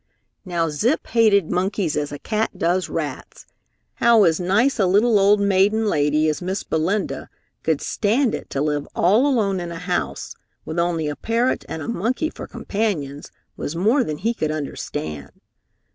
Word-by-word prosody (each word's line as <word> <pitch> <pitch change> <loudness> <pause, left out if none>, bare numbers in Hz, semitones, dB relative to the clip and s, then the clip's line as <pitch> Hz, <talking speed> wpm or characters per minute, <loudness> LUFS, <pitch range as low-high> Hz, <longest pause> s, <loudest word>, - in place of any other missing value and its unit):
Now 170 -3 0
Zip 225 - 0
hated 210 -7 +3
monkeys 185 -2 0
as 145 -1 -2
a 145 - -5
cat 215 +7 -2
does 175 +1 0
rats. 150 -5 -5 0.5
How 235 -2 +5
as 165 -3 +3
nice 210 +9 +2
a 195 - +4
little 210 +3 +4
old 200 +1 +5
maiden 200 +2 +3
lady 150 -4 +2
as 155 +1 -1
Miss 190 +2 -3
Belinda 160 -3 -1 0.3
could 160 -3 0
stand 230 +4 +1
it - - -5
to 140 - -1
live 150 -1 -1
all 215 +10 +4
alone 210 -8 +1
in 175 -1 -5
a 170 - -6
house 70 - -3 0.3
with 160 +2 -3
only 170 -2 0
a 150 - -3
parrot 235 - 0
and 160 - -5
a - - -7
monkey 240 - -1
for - - -8
companions 160 -10 -3 0.2
was 150 - -5
more 225 +10 +3
than 155 -6 -4
he 225 +7 0
could 155 -9 -2
understand. 80 - -5
185 Hz, 170 wpm, -22 LUFS, 155-215 Hz, 0.5 s, How